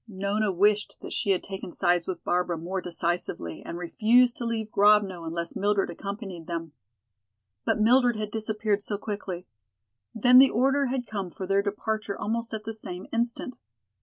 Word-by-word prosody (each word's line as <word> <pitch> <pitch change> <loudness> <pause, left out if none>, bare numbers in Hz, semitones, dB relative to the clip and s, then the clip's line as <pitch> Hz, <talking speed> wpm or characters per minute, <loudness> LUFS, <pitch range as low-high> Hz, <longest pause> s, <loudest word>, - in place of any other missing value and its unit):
Nona 200 +1 -1
wished 205 +3 +2
that - - -7
she - - -1
had 190 -2 +2
taken 195 -2 -6
sides 175 -1 +1
with 180 -2 -4
Barbara 180 -1 0
more 180 +4 -3
decisively 170 - -3
and 170 - -6
refused 230 +8 +3
to 240 - -4
leave 220 -2 -2
Grovno 200 -4 +4
unless 170 +1 -4
Mildred 205 0 +1
accompanied 195 -5 -7
them. 165 -2 -4 0.9
But - - +1
Mildred 245 +2 +4
had 215 -1 -4
disappeared 215 -1 -1
so 205 0 -2
quickly. 200 -4 -5 0.7
Then 250 +3 +7
the 270 0 +8
order 270 +4 +2
had 250 -1 -2
come 200 -4 -4
for 190 - -7
their 195 +1 +2
departure 210 0 -3
almost 230 +2 -2
at 220 -1 -4
the 225 +1 -5
same 185 -4 -6
instant. 235 +2 -2
205 Hz, 165 wpm, -27 LUFS, 180-220 Hz, 0.9 s, the